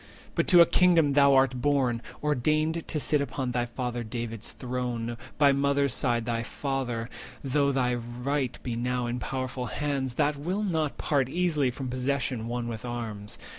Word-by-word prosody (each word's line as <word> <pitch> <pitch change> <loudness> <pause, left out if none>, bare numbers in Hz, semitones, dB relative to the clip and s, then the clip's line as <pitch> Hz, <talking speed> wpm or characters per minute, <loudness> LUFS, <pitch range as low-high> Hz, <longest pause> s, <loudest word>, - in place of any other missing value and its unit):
But - - 0
to 175 -2 +8
a - - +9
Kingdom 170 -6 +4
thou 140 -1 +6
art 130 -2 +3
born—ordained 145 +4 0
To 155 - -1
sit 150 0 +2
upon 130 -2 -2
thy 120 0 0
father 120 0 -3
David's 115 -1 -4
throne, 120 -2 -3 0.2
By 145 -1 +6
mother's 140 0 +2
side 120 -4 0
thy 115 -1 -1
father, 125 -3 -3 0.4
though 140 +1 +2
thy 125 -2 +1
right 125 +3 -2
Be 120 -2 -3
now 125 +1 -1
in 120 +1 -2
powerful 130 0 -3
hands, 140 -4 -2
that 150 0 +1
will 180 +8 -2
not 160 -7 -1
part 135 -4 +1
Easily 160 -4 +1
from 130 +2 -5
possession 130 -2 -1
won 120 0 -3
with 115 -2 -5
arms. 115 -4 -5
130 Hz, 165 wpm, -28 LUFS, 120-145 Hz, 0.4 s, a